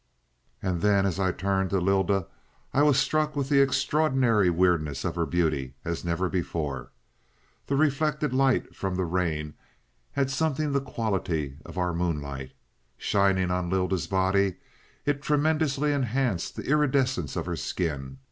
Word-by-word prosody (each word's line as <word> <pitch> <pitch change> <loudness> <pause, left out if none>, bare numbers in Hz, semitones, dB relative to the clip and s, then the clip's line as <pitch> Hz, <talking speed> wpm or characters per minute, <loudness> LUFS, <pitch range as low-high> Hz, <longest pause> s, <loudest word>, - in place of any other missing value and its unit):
"And 90 -3 -1
then, 100 -1 +3
as 95 -1 -1
I 95 -1 +2
turned 95 +1 0
to 95 - +1
Lylda, 95 0 +2 0.5
I 140 - +3
was 145 -2 +5
struck 155 +2 +1
with 140 -1 -1
the 140 -2 +5
extraordinary 135 - +3
weirdness 80 -5 +1
of 90 - -1
her 85 -1 -1
beauty 75 -7 0
as 85 0 -3
never 85 +2 0
before. 80 -7 -3 0.8
The 140 - 0
reflected 150 -1 +1
light 135 -1 +2
from 95 -1 -2
the 95 0 0
rain 80 -4 -1 0.6
had 135 -1 0
something 150 +1 0
the 140 0 +1
quality 95 - -2
of - - -11
our 90 -1 0
moonlight. 70 -6 -3 0.4
Shining 95 +2 +2
on 90 -1 -1
Lylda's 95 -1 0
body, 95 0 +2 0.5
it 145 -1 0
tremendously 150 -1 +1
enhanced 125 -7 -1
the - - -5
iridescence 130 - +1
of - - -2
her - - -2
skin. 70 -7 -3
95 Hz, 145 wpm, -27 LUFS, 85-135 Hz, 0.8 s, was